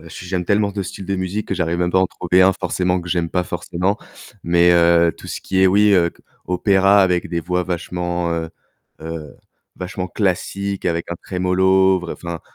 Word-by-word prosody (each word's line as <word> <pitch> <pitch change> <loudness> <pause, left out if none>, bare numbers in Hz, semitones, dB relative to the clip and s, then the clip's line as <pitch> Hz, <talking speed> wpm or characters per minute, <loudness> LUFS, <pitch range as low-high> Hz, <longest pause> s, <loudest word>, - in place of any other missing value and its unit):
heu, 85 - -13
j 90 - -9
j'aime 90 0 -2
tellement 100 +1 +1
de 100 0 -3
styles 95 0 -8
de 100 - -1
musique 95 +3 -3
que - - -1
j'arrive 85 -1 -1
même 90 0 0
pas 95 - +4
à - - +4
en - - +2
trouver 90 +1 +2
un 95 +1 +5
forcément 90 0 -1
que 85 - -9
j'aime 85 -2 -1
pas 90 -1 0
forcément, 90 +4 -2 0.4
mais 85 +1 +4
heu, 85 -1 +4
tout - - -11
ce - - -5
qui 95 - -1
est 95 - +6
oui, 105 +2 +4
heu, 85 -3 +3
c - - -25 0.2
opéra 95 +2 +4
avec 90 -2 0
des 85 - -2
voix 90 +2 -1
vachement, 90 0 -3
heu 80 -1 -3 0.5
heu, 80 -2 -7 0.4
vachement 90 0 -5
classique 100 +1 -2
avec 85 0 -2
un 85 - -2
tremolo, 95 +1 +2
vr 90 - -7
enfin. 85 -1 -6
90 Hz, 210 wpm, -20 LUFS, 85-95 Hz, 0.5 s, est